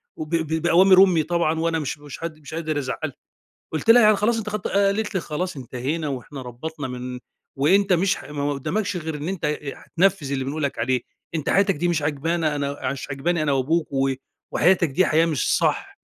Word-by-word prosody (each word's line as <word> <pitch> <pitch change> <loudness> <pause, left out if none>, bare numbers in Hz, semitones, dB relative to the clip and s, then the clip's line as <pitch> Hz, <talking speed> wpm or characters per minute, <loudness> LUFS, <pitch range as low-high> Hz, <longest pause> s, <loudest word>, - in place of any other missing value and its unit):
وب 155 +2 -3
ب 160 -1 -1
بأوامر 185 +3 +7
أمي 175 -5 +3
طبعًا 160 -1 0
وأنا 165 0 0
مش 150 -1 -3
مش 145 +2 -10
هد 155 -2 -5
مش 155 +2 -11
قادر 160 -2 -2
أزعّلها. 130 -3 -4 0.6
قُلت 160 +8 -3
لها: 240 +1 +9
"يعني 215 0 +6
خلاص 220 +3 +1
أنتِ 215 -1 -3
خدتِ" 210 -2 -3
قالت 200 +2 +1
لي: 190 - +1
"خلاص 180 +4 -3
انتهينا 135 +5 -3
وإحنا 135 +1 -6
ربّطنا 135 +4 -6
من 125 0 -6 0.4
وأنت 185 +8 +3
مش 185 +2 +2
ح - - -10
ما 145 -1 -2
قُدّامكش 195 +8 -2
غير 160 -2 -4
إن 150 +2 -5
أنت 185 -3 -3
أ 150 -2 -2
هتنفِّذ 175 -5 +1
اللي 135 -1 -1
بنقول 145 +3 -3
لك 140 - -2
عليه، 125 +2 +1 0.3
أنت 155 -1 -2
حياتك 195 0 +3
دي 170 +4 0
مش 170 -3 +1
عاجبانا، 155 +2 0
أنا 140 0 -2
ع 130 - -1
مش 140 0 -6
عاجباني 155 +5 0
أنا 145 - +1
وأبوك 150 +5 +1
و 135 0 +2 0.4
وحياتك 180 -2 +3
دي 180 +7 +2
حياة 160 +2 +3
مش 155 -5 +1
صح." - - -1
155 Hz, 210 wpm, -23 LUFS, 140-180 Hz, 0.6 s, لها